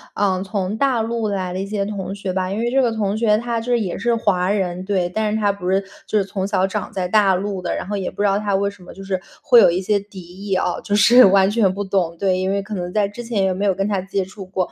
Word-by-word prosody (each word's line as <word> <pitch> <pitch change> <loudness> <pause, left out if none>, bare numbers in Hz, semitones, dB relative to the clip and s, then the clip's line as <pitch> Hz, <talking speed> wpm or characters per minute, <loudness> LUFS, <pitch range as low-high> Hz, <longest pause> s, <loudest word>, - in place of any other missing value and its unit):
啊， 190 -2 +1
从 195 0 -3
大 260 -3 +2
陆 230 -1 -2
来 185 -3 -2
的 185 - -3
一 195 - -2
些 205 -1 -2
同 195 -2 -4
学 195 -2 -4
吧， 185 0 -1
因 200 - -3
为 240 +1 -1
这 270 0 +3
个 240 - +2
同 210 -2 -1
学 215 -2 +3
他 235 0 -2
就 245 +2 -4
是 240 - +3
也 190 -5 -3
是 235 0 +1
华 180 -4 +1
人， 185 -3 -1
对， 190 -3 0
但 215 +2 -1
是 - - +1
他 205 -1 +2
不 190 -2 -5
是 195 +1 +2 0.3
就 215 - +1
是 195 - 0
从 195 0 -3
小 190 -2 +1
长 - - -4
在 185 -2 -2
大 195 -1 +4
陆 195 0 -3
的， 175 - -2
然 185 - -5
后 205 - -3
也 190 -2 -3
不 - - -6
知 205 - +4
道 200 +1 +2
他 205 -2 -1
为 200 +1 +1
什 200 -2 -15
么 - - -12
就 195 - -9
是 190 -1 -2 0.2
会 240 - +7
有 - - +7
一 175 - 0
些 205 +2 +1
敌 200 -1 -12
意 190 +3 -5
哦， 180 -1 -1
就 205 - 0
是， 240 +5 +7
完 190 0 +5
全 210 -4 +2
不 205 +1 -3
懂。 185 -4 -1
对， 185 -1 +1
因 190 0 -1
为 200 0 0
可 210 +2 -8
能 180 -1 -4
在 210 -2 +2
之 205 +4 -8
前 230 -4 -1
也 190 - +1
没 195 +3 -2
有 195 - +3
跟 195 +2 -1
他 200 -3 -1
接 195 0 -2
触 190 +1 -10
过。 185 -1 -3
200 Hz, 325 characters per minute, -20 LUFS, 185-210 Hz, 0.3 s, 会